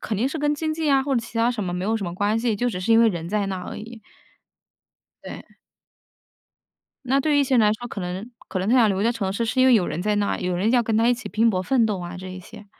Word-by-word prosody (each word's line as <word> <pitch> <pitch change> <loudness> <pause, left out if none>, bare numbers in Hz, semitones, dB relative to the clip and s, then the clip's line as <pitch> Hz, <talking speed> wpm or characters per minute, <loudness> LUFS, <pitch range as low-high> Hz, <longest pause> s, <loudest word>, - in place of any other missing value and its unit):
肯 215 - -3
定 235 +7 0
是 315 - -5
跟 295 0 +1
经 310 +1 -2
济 315 0 -3
呀， 275 -2 +3
或 275 0 -1
者 240 - +2
其 230 0 -10
他 230 +1 +3
什 230 -4 -3
么 175 - -3
没 180 - -3
有 220 +3 0
什 210 - -4
么 175 -1 -5
关 205 +4 0
系， 230 -1 0
就 245 +4 -1
只 195 -6 -4
是 200 +5 +1
因 225 - +6
为 230 - +5
人 170 -5 -4
在 205 +1 -1
那 190 -1 -3
儿 180 - -8
而 - - -7
已。 230 +1 -10 1.2
对。 - - -10 1.5
那 265 +2 +2
对 295 +1 +1
于 - - +4
一 - - +3
些 265 0 0
人 245 - +5
来 210 -1 +4
说， 240 +3 -6
可 205 - -6
能 185 +6 -5 0.2
可 190 - -3
能 185 +2 -2
他 245 - +4
想 235 -4 +5
留 195 -1 0
在 230 - +3
城 205 -5 -2
市 230 +4 -1
是 245 +3 0
因 260 - +5
为 255 - +6
有 185 -5 +3
人 170 - -3
在 210 +1 0
那 205 -1 0
儿， - - -3
有 180 0 -1
人 195 +5 +1
要 245 -1 +3
跟 225 -1 -1
他 225 +2 +3
一 245 - +4
起 235 -3 -8
拼 225 +3 +2
搏 185 -3 0
奋 235 +3 +2
斗 205 -3 -2
啊 175 0 -7
这 185 +1 -8
一 185 0 -8
些。 210 +3 -13
220 Hz, 340 characters per minute, -23 LUFS, 195-245 Hz, 1.5 s, 因